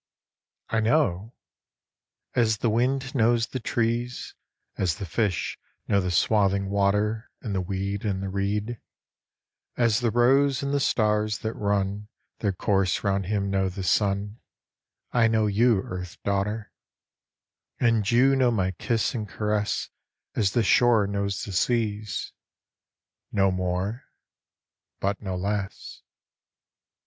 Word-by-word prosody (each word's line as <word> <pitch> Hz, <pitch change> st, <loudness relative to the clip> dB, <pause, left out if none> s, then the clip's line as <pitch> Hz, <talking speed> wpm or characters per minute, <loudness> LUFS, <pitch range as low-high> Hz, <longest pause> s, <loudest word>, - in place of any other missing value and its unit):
I 115 Hz, -, +1 dB
know? 110 Hz, -, +1 dB, 1.0 s
As 110 Hz, -3 st, +3 dB
the 115 Hz, -, 0 dB
wind 130 Hz, +4 st, 0 dB
knows 115 Hz, -2 st, +3 dB
the 130 Hz, -, -5 dB
trees, 120 Hz, +1 st, -2 dB, 0.4 s
As 90 Hz, -4 st, 0 dB
the 100 Hz, -, -6 dB
fish 100 Hz, +1 st, -1 dB, 0.3 s
know 100 Hz, -, +3 dB
the 90 Hz, -, -2 dB
swathing 100 Hz, +2 st, +2 dB
water 105 Hz, +3 st, +1 dB
And 105 Hz, -, -4 dB
the 95 Hz, -, 0 dB
weed 100 Hz, +2 st, -3 dB
and 100 Hz, -3 st, -1 dB
the 95 Hz, -, -3 dB
reed; 105 Hz, +4 st, -2 dB, 1.0 s
As 115 Hz, -2 st, +3 dB
the 120 Hz, -1 st, +1 dB
rose 135 Hz, +4 st, +3 dB
and 140 Hz, 0 st, -1 dB
the 145 Hz, -, +2 dB
stars 105 Hz, -4 st, +1 dB
that 110 Hz, -, -1 dB
run 100 Hz, 0 st, -1 dB, 0.3 s
Their 105 Hz, -, +1 dB
course 95 Hz, -1 st, 0 dB
round 100 Hz, -2 st, 0 dB
him 100 Hz, -1 st, -1 dB
know 95 Hz, -1 st, +1 dB
the 95 Hz, +1 st, -6 dB
sun, 100 Hz, +4 st, 0 dB, 0.7 s
I 115 Hz, -2 st, +4 dB
know 110 Hz, -1 st, +2 dB
you 105 Hz, 0 st, +3 dB
Earth 90 Hz, -1 st, -7 dB
daughter; 105 Hz, +2 st, -2 dB, 1.1 s
And 115 Hz, -4 st, +2 dB
you 130 Hz, +3 st, +4 dB
know 130 Hz, -2 st, +3 dB
my 95 Hz, -5 st, 0 dB
kiss 115 Hz, +5 st, -1 dB
and 110 Hz, -5 st, -4 dB
caress 105 Hz, 0 st, -1 dB, 0.4 s
As 100 Hz, -3 st, +1 dB
the 120 Hz, -, +2 dB
shore 115 Hz, 0 st, +4 dB
knows 100 Hz, -1 st, -2 dB
the 100 Hz, -, -6 dB
sea's. 105 Hz, +1 st, -1 dB, 1.0 s
No 95 Hz, -2 st, +3 dB
more? 95 Hz, +5 st, -2 dB, 0.9 s
But 100 Hz, 0 st, -1 dB
no 95 Hz, -3 st, -3 dB
less. 100 Hz, +1 st, -4 dB
105 Hz, 130 wpm, -26 LUFS, 100-115 Hz, 1.1 s, I